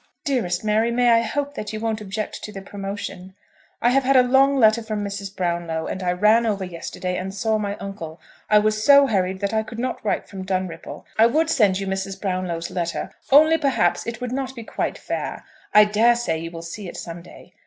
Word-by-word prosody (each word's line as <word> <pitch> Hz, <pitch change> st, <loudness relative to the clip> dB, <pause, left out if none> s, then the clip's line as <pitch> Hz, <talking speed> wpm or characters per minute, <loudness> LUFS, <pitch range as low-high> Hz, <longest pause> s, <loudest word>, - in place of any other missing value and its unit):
Dearest 220 Hz, -11 st, 0 dB
Mary, 220 Hz, +2 st, +2 dB
may 240 Hz, 0 st, +3 dB
I 230 Hz, 0 st, +5 dB
hope 285 Hz, +5 st, -2 dB
that 210 Hz, 0 st, -5 dB
you 215 Hz, -, -4 dB
won't 220 Hz, -1 st, -2 dB
object 210 Hz, +1 st, -5 dB
to 210 Hz, -, -6 dB
the 200 Hz, -, -7 dB
promotion? 195 Hz, -2 st, -7 dB, 0.5 s
I 240 Hz, -, +5 dB
have 275 Hz, +2 st, +4 dB
had 270 Hz, +1 st, +2 dB
a 255 Hz, -, +7 dB
long 270 Hz, +2 st, +4 dB
letter 220 Hz, -1 st, +5 dB
from 215 Hz, -2 st, -3 dB
Mrs. 200 Hz, -1 st, -5 dB
Brownlow; 170 Hz, -2 st, -2 dB
and 190 Hz, -, -4 dB
I 180 Hz, -1 st, +1 dB
ran 210 Hz, +6 st, +4 dB
over 200 Hz, -3 st, -1 dB
yesterday 180 Hz, +1 st, -5 dB
and 185 Hz, +1 st, -4 dB
saw 220 Hz, +1 st, 0 dB
my 205 Hz, -1 st, -2 dB
uncle. 195 Hz, -6 st, -8 dB, 0.3 s
I 210 Hz, -, +6 dB
was 215 Hz, 0 st, +2 dB
so 280 Hz, +2 st, +7 dB
hurried 190 Hz, -5 st, 0 dB
that 200 Hz, +1 st, -1 dB
I 220 Hz, -, +2 dB
could 225 Hz, +1 st, -9 dB
not 255 Hz, +2 st, -3 dB
write 215 Hz, -, -1 dB
from 190 Hz, -2 st, -7 dB
Dunripple. 185 Hz, -2 st, -4 dB
I 225 Hz, -, +8 dB
would 315 Hz, +6 st, +1 dB
send 205 Hz, -9 st, +3 dB
you 195 Hz, -, -3 dB
Mrs. 195 Hz, 0 st, -3 dB
Brownlow's 185 Hz, -3 st, -3 dB
letter, 170 Hz, -2 st, -3 dB, 0.2 s
only 315 Hz, +3 st, +6 dB
perhaps 275 Hz, -5 st, +1 dB
it 235 Hz, 0 st, -4 dB
would 250 Hz, -1 st, -4 dB
not 265 Hz, 0 st, -3 dB
be 230 Hz, -, -7 dB
quite -, -, -3 dB
fair. -, -, -4 dB, 0.3 s
I 210 Hz, 0 st, +7 dB
dare 220 Hz, +3 st, +4 dB
say 200 Hz, -10 st, -1 dB
you 165 Hz, +1 st, -5 dB
will 165 Hz, 0 st, -8 dB
see 185 Hz, +4 st, -7 dB
it -, -, -8 dB
some 170 Hz, 0 st, -7 dB
day. 170 Hz, -, -15 dB
210 Hz, 220 wpm, -22 LUFS, 185-235 Hz, 0.5 s, I